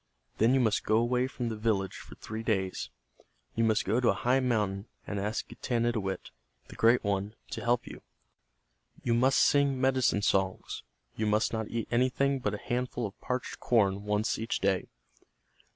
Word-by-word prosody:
Then 115 Hz, +4 st, +5 dB
you -, -, +4 dB
must 110 Hz, -4 st, +2 dB
go 110 Hz, -, +2 dB
away 125 Hz, +2 st, +2 dB
from 125 Hz, -3 st, -4 dB
the 110 Hz, -, -3 dB
village 105 Hz, -3 st, 0 dB
for -, -, -11 dB
three 110 Hz, +1 st, -6 dB
days. 95 Hz, -5 st, -1 dB, 0.6 s
You 115 Hz, -, +1 dB
must 110 Hz, -1 st, +2 dB
go 110 Hz, +5 st, +2 dB
to 125 Hz, -, +3 dB
a -, -, +3 dB
high 125 Hz, +2 st, +2 dB
mountain, 105 Hz, -5 st, 0 dB, 0.2 s
and 100 Hz, -, -3 dB
ask 105 Hz, +3 st, -2 dB
Getanittowit, 115 Hz, -5 st, -2 dB, 0.4 s
the -, -, -10 dB
Great 115 Hz, +2 st, +4 dB
One, 100 Hz, +1 st, -1 dB, 0.2 s
to -, -, -4 dB
help 120 Hz, +1 st, +1 dB
you. -, -, -10 dB, 1.0 s
You 120 Hz, -, +1 dB
must 130 Hz, +3 st, +3 dB
sing 140 Hz, -2 st, +4 dB
medicine 130 Hz, -5 st, +2 dB
songs. 95 Hz, -1 st, 0 dB, 0.3 s
You 110 Hz, -, -1 dB
must 105 Hz, +2 st, +2 dB
not 110 Hz, -1 st, -2 dB
eat 115 Hz, -2 st, -3 dB
anything 130 Hz, +3 st, +2 dB
but 105 Hz, -4 st, -1 dB
a -, -, -11 dB
handful 125 Hz, -1 st, -1 dB
of 100 Hz, -, -8 dB
parched 125 Hz, -2 st, -3 dB
corn 100 Hz, -5 st, +2 dB
once 105 Hz, +1 st, 0 dB
each 115 Hz, +1 st, -2 dB
day. 95 Hz, -1 st, +1 dB
115 Hz, 175 wpm, -30 LUFS, 105-125 Hz, 1.0 s, Then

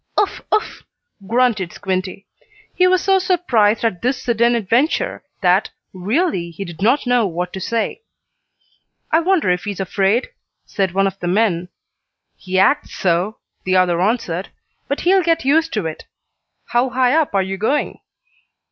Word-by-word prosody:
"Uff! 410 Hz, -, 0 dB
Uff!" 430 Hz, -, -1 dB, 0.5 s
grunted 230 Hz, -6 st, +1 dB
Squinty. 190 Hz, 0 st, -4 dB, 0.5 s
He 365 Hz, -, +3 dB
was 370 Hz, 0 st, +2 dB
so 385 Hz, 0 st, +3 dB
surprised 250 Hz, -, +2 dB
at 185 Hz, -7 st, -1 dB
this 250 Hz, +1 st, 0 dB
sudden 235 Hz, 0 st, +2 dB
adventure 235 Hz, -, 0 dB, 0.2 s
that, -, -, +3 dB, 0.2 s
really, 190 Hz, -, -1 dB
he 170 Hz, +4 st, -7 dB
did 170 Hz, -1 st, -10 dB
not 250 Hz, +8 st, +2 dB
know 245 Hz, -3 st, +2 dB
what 180 Hz, +1 st, -4 dB
to 190 Hz, -, -6 dB
say. 230 Hz, -, -2 dB, 1.1 s
"I 320 Hz, -, +5 dB
wonder 335 Hz, -, +2 dB
if 180 Hz, +2 st, -2 dB
he's 205 Hz, -2 st, -4 dB
afraid?" 195 Hz, -, 0 dB, 0.4 s
said 190 Hz, -4 st, -2 dB
one 195 Hz, 0 st, +3 dB
of 195 Hz, 0 st, -3 dB
the 175 Hz, -, -4 dB
men. 180 Hz, -2 st, +1 dB, 0.7 s
"He 185 Hz, 0 st, -4 dB
acts 275 Hz, +10 st, +2 dB
so," 180 Hz, +4 st, 0 dB, 0.3 s
the 185 Hz, 0 st, 0 dB
other 180 Hz, -2 st, +2 dB
answered. 190 Hz, -4 st, -1 dB, 0.4 s
"But 280 Hz, -, -2 dB
he'll 380 Hz, +2 st, +4 dB
get 330 Hz, -3 st, 0 dB
used 320 Hz, +4 st, +2 dB
to 210 Hz, -6 st, -1 dB
it. 160 Hz, -1 st, -6 dB, 0.6 s
How 245 Hz, +2 st, +2 dB
high 255 Hz, 0 st, +2 dB
up 310 Hz, -8 st, +1 dB
are 195 Hz, -, +3 dB
you 190 Hz, +1 st, -4 dB
going?" 245 Hz, +9 st, -1 dB
220 Hz, 155 wpm, -19 LUFS, 185-275 Hz, 1.1 s, I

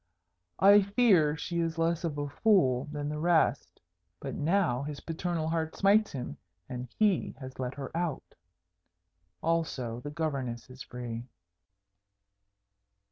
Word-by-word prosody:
I 200 Hz, +2 st, +7 dB
fear 195 Hz, -7 st, +3 dB
she 170 Hz, +1 st, -3 dB
is 165 Hz, -1 st, -1 dB
less 165 Hz, +1 st, +1 dB
of 155 Hz, -4 st, -2 dB
a 145 Hz, 0 st, -2 dB
fool 140 Hz, -, +3 dB
than 145 Hz, -1 st, -4 dB
the 150 Hz, 0 st, -3 dB
rest. 170 Hz, 0 st, +2 dB, 0.4 s
But -, -, -5 dB
now 160 Hz, -5 st, +1 dB
his 145 Hz, 0 st, -5 dB
paternal 165 Hz, -1 st, -2 dB
heart 160 Hz, -1 st, -1 dB
smites 205 Hz, +2 st, +4 dB
him, 125 Hz, -3 st, -5 dB, 0.3 s
and 125 Hz, 0 st, -5 dB
he 210 Hz, -4 st, +2 dB
has 130 Hz, -1 st, -9 dB
let 125 Hz, 0 st, -3 dB
her 140 Hz, +2 st, -7 dB
out. 170 Hz, -4 st, -3 dB, 1.1 s
Also 145 Hz, -8 st, -1 dB
the 145 Hz, -, -6 dB
Governess 135 Hz, -6 st, -3 dB
is 130 Hz, +1 st, -11 dB
free." 120 Hz, -1 st, -6 dB
155 Hz, 135 wpm, -30 LUFS, 130-170 Hz, 1.1 s, I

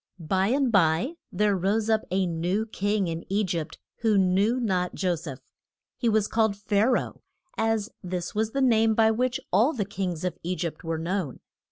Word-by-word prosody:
BY 185 Hz, +3 st, 0 dB
and 265 Hz, +1 st, +2 dB
by 180 Hz, -, +3 dB, 0.2 s
there 210 Hz, -1 st, +2 dB
rose 200 Hz, +4 st, 0 dB
up 220 Hz, -1 st, +3 dB
a 190 Hz, +1 st, +1 dB
new 175 Hz, +5 st, -1 dB
King 205 Hz, -1 st, -1 dB
in 165 Hz, 0 st, -4 dB
E 205 Hz, +2 st, +1 dB
gypt 170 Hz, -5 st, -3 dB, 0.2 s
who 220 Hz, -3 st, +2 dB
knew 195 Hz, +6 st, +2 dB
not 185 Hz, -6 st, -1 dB
Jo 185 Hz, -3 st, +1 dB
seph. 140 Hz, -5 st, -7 dB, 0.5 s
He 235 Hz, -, 0 dB
was 215 Hz, -1 st, +2 dB
called 220 Hz, -2 st, +1 dB
Pha 205 Hz, +1 st, +1 dB
ra 250 Hz, -, +1 dB
oh, -, -, -27 dB, 0.3 s
as 225 Hz, -1 st, 0 dB
this 180 Hz, -2 st, -4 dB
was 215 Hz, +1 st, 0 dB
the 275 Hz, +4 st, -2 dB
name 225 Hz, -3 st, +4 dB
by 220 Hz, 0 st, +4 dB
which 250 Hz, +3 st, 0 dB
all 230 Hz, -, +4 dB
the 210 Hz, -6 st, -2 dB
kings 185 Hz, -4 st, -4 dB
of 180 Hz, -, -3 dB
E 180 Hz, +2 st, -2 dB
gypt 170 Hz, -3 st, -4 dB
were 165 Hz, -1 st, -2 dB
known. 170 Hz, -3 st, -3 dB
200 Hz, 195 wpm, -26 LUFS, 180-220 Hz, 0.5 s, name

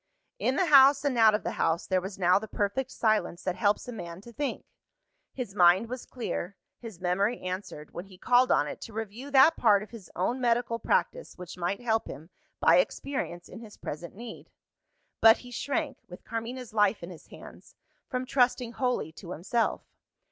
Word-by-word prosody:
In 265 Hz, -, +1 dB
the 370 Hz, -, +2 dB
house 275 Hz, -2 st, +6 dB
and 280 Hz, -3 st, +1 dB
out 220 Hz, -2 st, +6 dB
of 210 Hz, -, -3 dB
the -, -, -2 dB
house, 165 Hz, +1 st, +1 dB
there 185 Hz, -1 st, +1 dB
was 190 Hz, +1 st, -7 dB
now 185 Hz, 0 st, +4 dB
the 220 Hz, -, -8 dB
perfect 210 Hz, +6 st, -2 dB
silence 215 Hz, -7 st, 0 dB
that 185 Hz, -, -1 dB
helps 205 Hz, +5 st, +1 dB
a -, -, -5 dB
man 170 Hz, -6 st, -8 dB
to 235 Hz, +3 st, -13 dB
think. 290 Hz, +4 st, -3 dB, 0.7 s
His 245 Hz, -7 st, -6 dB
mind 185 Hz, +4 st, +4 dB
was 255 Hz, 0 st, -6 dB
clear; 205 Hz, -6 st, -5 dB, 0.2 s
his 225 Hz, -7 st, -10 dB
memory 195 Hz, +6 st, 0 dB
answered, 185 Hz, -5 st, -6 dB
when 175 Hz, -, -6 dB
he 190 Hz, -2 st, -16 dB
called 245 Hz, +5 st, +3 dB
on 145 Hz, -, +3 dB
it -, -, -7 dB
to 225 Hz, -, -9 dB
review 225 Hz, +5 st, -6 dB
that 285 Hz, +4 st, +6 dB
part 210 Hz, -3 st, +4 dB
of 210 Hz, -, -13 dB
his 220 Hz, -7 st, -11 dB
own 240 Hz, +8 st, -1 dB
medical 235 Hz, -1 st, +1 dB
practice -, -, -1 dB
which 180 Hz, -1 st, -9 dB
might 180 Hz, +4 st, -2 dB
help 225 Hz, -2 st, 0 dB
him, 160 Hz, +4 st, -10 dB, 0.3 s
by -, -, +5 dB
experience, 270 Hz, -, -2 dB
in -, -, -10 dB
his 220 Hz, -3 st, -12 dB
present 165 Hz, +5 st, -7 dB
need. 230 Hz, +1 st, -10 dB, 0.7 s
But 225 Hz, 0 st, +7 dB
he 245 Hz, -, -13 dB
shrank 285 Hz, +5 st, -3 dB
with 180 Hz, -, -12 dB
Carmina's 230 Hz, +1 st, -6 dB
life 210 Hz, -3 st, +2 dB
in 170 Hz, -, -7 dB
his 170 Hz, -, -13 dB
hands -, -, -14 dB, 0.3 s
from 255 Hz, -1 st, -2 dB
trusting 250 Hz, -2 st, +1 dB
wholly 250 Hz, -, -1 dB
to 175 Hz, +2 st, -9 dB
himself. 225 Hz, +8 st, -1 dB
220 Hz, 190 wpm, -28 LUFS, 185-250 Hz, 0.7 s, But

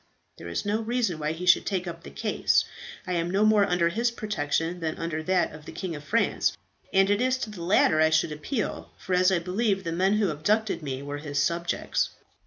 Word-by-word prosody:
There -, -, -8 dB
is 85 Hz, -, -3 dB
no 210 Hz, +2 st, 0 dB
reason 225 Hz, -7 st, -1 dB
why 150 Hz, +1 st, -1 dB
he 175 Hz, +3 st, -6 dB
should 180 Hz, -, +5 dB
take 190 Hz, -2 st, -2 dB
up 170 Hz, -1 st, -6 dB
the -, -, -10 dB
case. -, -, +1 dB, 0.4 s
I 180 Hz, -, -2 dB
am 170 Hz, 0 st, 0 dB
no 200 Hz, +4 st, +2 dB
more 210 Hz, -2 st, +4 dB
under 175 Hz, -1 st, +2 dB
his 230 Hz, +7 st, +1 dB
protection 175 Hz, -6 st, -2 dB
than 160 Hz, -2 st, -3 dB
under 165 Hz, -1 st, -3 dB
that 185 Hz, +2 st, +1 dB
of 150 Hz, 0 st, -11 dB
the -, -, -8 dB
King 180 Hz, -4 st, -5 dB
of 145 Hz, -, -8 dB
France, 230 Hz, +10 st, +1 dB, 0.3 s
and 195 Hz, 0 st, +4 dB
it 205 Hz, +2 st, +2 dB
is 255 Hz, +1 st, +2 dB
to 230 Hz, -4 st, -5 dB
the 190 Hz, -5 st, -9 dB
latter 170 Hz, -3 st, +3 dB
I 160 Hz, -, +5 dB
should 155 Hz, 0 st, +2 dB
appeal, 200 Hz, -, -3 dB
for 185 Hz, -, -4 dB
as 180 Hz, +1 st, +4 dB
I 190 Hz, -, +3 dB
believe 195 Hz, +3 st, 0 dB
the 165 Hz, -, -3 dB
men 185 Hz, +4 st, +2 dB
who 210 Hz, -4 st, +2 dB
abducted 205 Hz, +5 st, 0 dB
me 135 Hz, -2 st, -4 dB
were 145 Hz, 0 st, -5 dB
his 145 Hz, -1 st, -5 dB
subjects." 170 Hz, +3 st, 0 dB
180 Hz, 225 wpm, -26 LUFS, 160-205 Hz, 0.4 s, should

